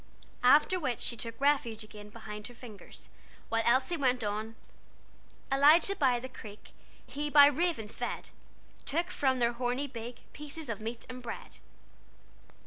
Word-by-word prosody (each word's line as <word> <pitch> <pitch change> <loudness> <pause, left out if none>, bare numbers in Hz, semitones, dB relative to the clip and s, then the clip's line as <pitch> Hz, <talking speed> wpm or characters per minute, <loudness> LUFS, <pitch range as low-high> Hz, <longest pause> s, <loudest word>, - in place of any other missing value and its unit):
After 295 +8 +5
which 260 -7 -2
she - - 0
took 230 +1 -5
refuge 270 -6 +1
again 210 -1 -11
behind 210 -1 -8
her 245 - -13
fingers, 230 -4 -10 0.4
while 225 0 +2
Elsie 260 +8 +2
went 255 -4 +1
on 215 +2 -3 1.0
"Elijah 300 +8 +5
by 260 -7 +3
the 255 - -6
creek, 210 -5 -12 0.3
He 295 +1 -4
by 290 -1 +9
ravens 290 -7 0
fed, - - -4 0.6
Took 340 +5 0
from 265 -5 +1
their 240 -1 +2
horny 245 +3 -1
beak 235 -2 -8
Pieces 300 -1 -7
of 220 -2 -4
meat 230 +2 -5
and 255 0 -8
bread." 235 -1 -7
250 Hz, 145 wpm, -31 LUFS, 225-285 Hz, 1.0 s, by